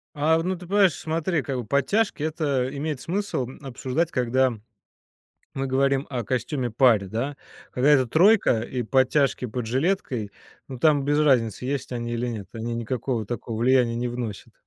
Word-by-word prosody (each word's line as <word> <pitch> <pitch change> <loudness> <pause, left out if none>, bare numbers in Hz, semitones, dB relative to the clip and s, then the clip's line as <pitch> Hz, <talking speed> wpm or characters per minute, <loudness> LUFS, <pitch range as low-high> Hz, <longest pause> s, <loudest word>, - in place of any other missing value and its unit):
А, 155 +2 +3
ну 185 +2 -1
ты 180 - -11
понимаешь, 195 -1 +4
смотри, 165 +1 -1
как 130 -5 -4
подтяжки 145 - +1
это 150 -5 0
имеет 145 -1 -3
смысл 175 -5 -2
обсуждать, 135 +4 -2
когда 130 0 +1 1.0
мы 135 0 -2
говорим 135 +1 +1
о 125 -3 -3
костюме-паре, 125 -4 +1
да. 125 +8 -3 0.4
Когда 130 +3 +2
это 135 -4 +5
тройка 175 - +4
и 125 +2 -3
подтяжки 130 +3 +2
под 120 0 -4
жилеткой, 130 - -1 0.4
ну, 130 -2 -7
там 145 0 +3
без 145 +2 +1
разницы, 125 -6 +2
есть 135 -1 -3
они 120 -1 -3
или 120 +1 -2
нет. 110 -5 -5
Они 115 +1 -4
никакого 120 0 -2
такого 115 +1 -5
влияния 125 -1 +3
не 120 +1 -1
вносят. 120 -4 -6
130 Hz, 155 wpm, -24 LUFS, 120-150 Hz, 1.0 s, это